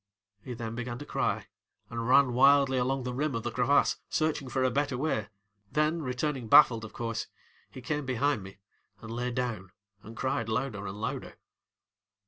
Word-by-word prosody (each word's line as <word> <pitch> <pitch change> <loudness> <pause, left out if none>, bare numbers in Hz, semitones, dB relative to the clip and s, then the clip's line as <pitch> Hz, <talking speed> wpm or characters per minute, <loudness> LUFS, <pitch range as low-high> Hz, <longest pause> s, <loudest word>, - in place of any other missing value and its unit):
ŌĆØ - - -32
He 125 - -5
then 115 -1 -5
began 120 0 -4
to 145 - -8
cry - - -1 0.5
and 115 0 -3
ran 130 0 +5
wildly 135 0 +5
along 130 +1 0
the 125 0 -3
rim 140 +1 -1
of 115 - -3
the 120 - -2
crevasse, 130 +5 +3
searching 155 -4 -1
for 130 +1 0
a 130 - +2
better 140 -1 0
way, 125 -7 -1 0.4
then, 155 +2 +1
returning 130 -1 -2
baffled, 115 -2 +7
of 110 - -8
course, 115 -1 -4 0.4
he 130 - -10
came 150 +3 -2
behind 130 -1 +1
me 95 +1 -11 0.5
and 115 - -7
lay 120 +2 -2
down 120 -7 -3 0.3
and 110 +2 -12
cried 115 -4 -1
louder 110 -3 -2
and 100 +2 -7
louder. 125 +4 -4
125 Hz, 180 wpm, -29 LUFS, 115-140 Hz, 0.5 s, baffled